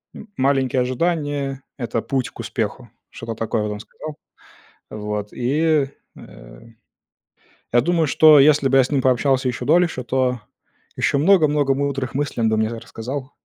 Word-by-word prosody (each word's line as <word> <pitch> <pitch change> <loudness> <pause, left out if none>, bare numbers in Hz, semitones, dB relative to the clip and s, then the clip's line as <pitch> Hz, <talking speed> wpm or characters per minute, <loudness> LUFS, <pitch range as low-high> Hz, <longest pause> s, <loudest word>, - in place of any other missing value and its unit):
м 215 - -10
маленькие 130 -1 +1
ожидания- 140 0 -2
это 120 -3 -2
путь 130 -2 -2
к - - -19
успеху. - - -4 0.2
Что-то 115 0 -7
такое, 110 -1 -2
вот, 105 - -3
он 105 - -5
сказал. 155 +7 -9 0.7
Вот, 105 -1 -5
и, 145 +3 +1 0.3
э, - - -14 1.1
я 120 0 +4
думаю, 165 +1 +1
что 155 +1 +6
если 140 -1 +5
бы 135 - +4
я 135 - +6
с 125 - -4
ним 140 -2 +1
пообщался 130 +1 +2
ещё 125 0 -3
дольше, 165 -3 +2
то 125 0 0 0.6
ещё 140 - +1
много-много 150 -5 +3
мудрых 135 -2 -3
мыслей 140 -4 -2
он 110 - +3
бы 110 - +1
мне 110 0 +1
р 115 -1 -6
рассказал. 130 +4 -7
135 Hz, 160 wpm, -21 LUFS, 120-145 Hz, 1.1 s, что